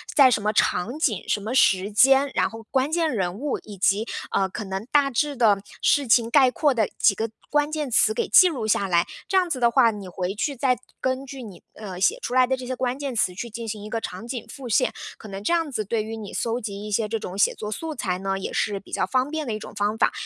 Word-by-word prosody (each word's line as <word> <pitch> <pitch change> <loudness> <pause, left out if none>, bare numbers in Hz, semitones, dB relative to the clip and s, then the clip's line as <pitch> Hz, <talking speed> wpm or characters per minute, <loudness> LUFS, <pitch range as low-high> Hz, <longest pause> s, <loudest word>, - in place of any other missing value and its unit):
在 275 -4 +7
什 235 - +1
么 210 +1 0
场 220 +7 0
景、 225 - 0
什 - - +1
么 220 +5 -4
时 195 -5 +3
间， 270 +6 +5
然 - - +2
后 225 0 -10
关 265 +3 0
键 330 -1 +1
人 190 -9 -1
物， 290 0 -2
以 210 - -10
及， 200 +4 +2 0.2
呃， 195 - +1
可 200 +4 -6
能 195 +1 -5
大 285 -2 +4
致 285 +3 -1
的 220 -5 +4 0.2
事 285 -2 +3
情， 230 0 +4
概 260 0 +5
括 290 +1 +2
的 220 -5 +1
几 200 - +4
个 225 +2 -2 0.2
关 295 0 +1
键 305 -3 -2
词 215 -1 +4
给 - - -1
记 365 - +7
录 270 -10 -3
下 200 -2 +1
来， 170 -1 +2 0.2
这 385 - +2
样 360 -2 +2
子 270 - -2
的 235 -1 +4
话， 235 -2 +5
你 205 -3 -8
回 180 +1 -3
去 280 +7 -2
再 250 0 +1 0.2
根 260 +1 -1
据 270 -1 -8
你， 200 -6 -11
呃， 195 -4 -8
写 405 - +2
出 250 - -4
来 255 0 +5
的 265 - +1
这 255 - -7
些 255 +1 -3
关 255 0 -2
键 280 -3 -4
词 185 -5 +1
去 235 +6 -6
进 230 +1 -7
行 210 -1 -5
一 210 - -8
个 230 - -2
场 185 +2 -6
景 245 -1 -5
复 270 -3 -9
现。 215 - +2 0.2
可 220 - -12
能 195 0 -7
这 - - 0
样 330 -3 +1
子 220 -5 -2
对 215 +2 -1
于 220 +1 -6
你 210 -3 -8
搜 235 +1 -1
集 205 -2 -6
一 210 - -6
些 215 +1 +1
这 225 +1 -2
种 190 -1 -7
写 - - +3
作 210 0 -6
素 320 +8 -4
材 180 -8 -2
呢， 195 0 -2
也 - - -5
是 205 -2 -1
比 - - -18
较 - - 0
方 260 +1 0
便 315 0 -3
的 230 - -2
一 215 - -4
种 - - -10
方 205 +1 -1
法。 - - +3
230 Hz, 295 characters per minute, -24 LUFS, 205-270 Hz, 0.2 s, 在